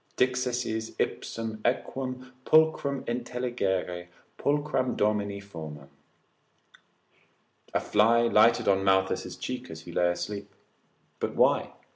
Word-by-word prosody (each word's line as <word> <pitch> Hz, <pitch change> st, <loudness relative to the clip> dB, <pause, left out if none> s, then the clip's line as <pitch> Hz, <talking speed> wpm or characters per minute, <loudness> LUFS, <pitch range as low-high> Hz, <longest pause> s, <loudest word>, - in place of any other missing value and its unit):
dixisses 125 Hz, -3 st, 0 dB
ipsum 110 Hz, -1 st, -3 dB
equum 130 Hz, -1 st, -2 dB
pulchrum 155 Hz, -3 st, +3 dB
intelligere 120 Hz, -8 st, -2 dB, 0.3 s
pulchram 145 Hz, -3 st, 0 dB
domini 100 Hz, -1 st, 0 dB
fomam? 80 Hz, -8 st, -9 dB, 1.9 s
A -, -, +4 dB
fly 115 Hz, +3 st, +4 dB
lighted 115 Hz, 0 st, +4 dB
on 95 Hz, -1 st, +3 dB
Malthius' 95 Hz, 0 st, +1 dB
cheek 125 Hz, 0 st, -5 dB
as 80 Hz, 0 st, -8 dB
he 85 Hz, -, -10 dB
lay 85 Hz, +1 st, +2 dB
asleep; 100 Hz, +3 st, -4 dB, 0.6 s
but -, -, -2 dB
why? -, -, +3 dB
110 Hz, 100 wpm, -28 LUFS, 95-125 Hz, 1.9 s, A